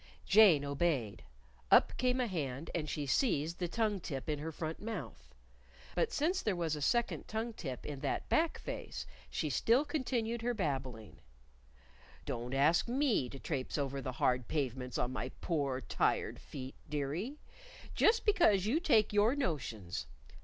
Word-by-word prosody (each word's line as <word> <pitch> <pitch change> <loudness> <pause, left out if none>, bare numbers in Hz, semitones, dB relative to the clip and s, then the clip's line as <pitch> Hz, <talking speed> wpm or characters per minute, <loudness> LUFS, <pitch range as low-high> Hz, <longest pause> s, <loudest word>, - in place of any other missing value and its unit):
Jane 190 -9 +6
obeyed. 140 -7 0 0.5
Up - - +6
came 250 +1 +1
a 250 - +2
hand, 150 - -3
and 155 -3 -2
she 150 -1 -2
seized 160 - +1
the 175 - 0
tongue 210 +1 0
tip 135 -6 -5
in 150 -2 -1
her 160 +2 -4
front 160 +1 -5
mouth. 130 - -7 0.6
But - - +1
since 350 +6 +1
there 210 -4 0
was 165 -3 -1
a 150 - -6
second 235 - +1
tongue 225 +2 -3
tip 135 -11 -6
in 145 -2 -5
that 140 0 -2
back 325 +1 +2
face, - - -6 0.2
she - - -2
still 245 +6 +3
continued 240 -6 -1
her 240 +1 0
babbling: 130 - -3 1.1
"Don't 120 +3 -3
ask 155 - +4
me 245 - +1
to 135 - -8
trapse 135 -1 -3
over 140 -1 -2
the 130 -1 -4
hard 125 -1 +1
pavements 130 -4 -2
on 125 - -1
my 125 -1 -3
poor 140 -6 -1
tired - - 0
feet, 130 -2 -7 0.2
dearie, 150 - -2 0.6
just 455 +1 +3
because 335 - +4
you 255 +10 +2
take 225 - +3
your 210 +5 +4
notions.... 110 - -3
160 Hz, 160 wpm, -34 LUFS, -, 1.1 s, Jane